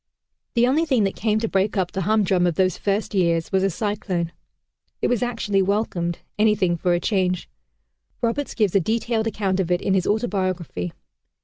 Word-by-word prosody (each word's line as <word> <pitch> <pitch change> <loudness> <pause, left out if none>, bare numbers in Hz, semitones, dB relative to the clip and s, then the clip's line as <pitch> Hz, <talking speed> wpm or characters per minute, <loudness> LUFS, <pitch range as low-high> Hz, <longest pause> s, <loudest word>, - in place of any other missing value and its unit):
The 235 0 +5
only 280 +6 +2
thing 260 -9 +2
that 195 - 0
came 215 0 +1
to 225 - 0
break 200 +1 0
up 180 -2 0
the 190 - -3
humdrum 190 -2 +2
of 170 - 0
those 185 -1 +2
first 205 +2 -1
years 170 -4 +1
was 190 -1 +2
a 195 - +2
cyclone. 190 -3 -2 0.7
It - - 0
was 245 -3 +1
actually 230 -5 0
welcomed; 185 -4 0 0.2
anything 210 -5 +3
for 175 +1 +1
a - - 0
change! 185 -2 0 0.7
Roberts 240 +5 -1
gives 210 -6 +2
a 195 - +5
detailed 225 +3 0
account 195 -3 -1
of 180 -3 0
it 175 0 +2
in 195 - 0
his 190 -2 +1
autobiography. 185 - -1
195 Hz, 185 wpm, -23 LUFS, 180-220 Hz, 0.7 s, The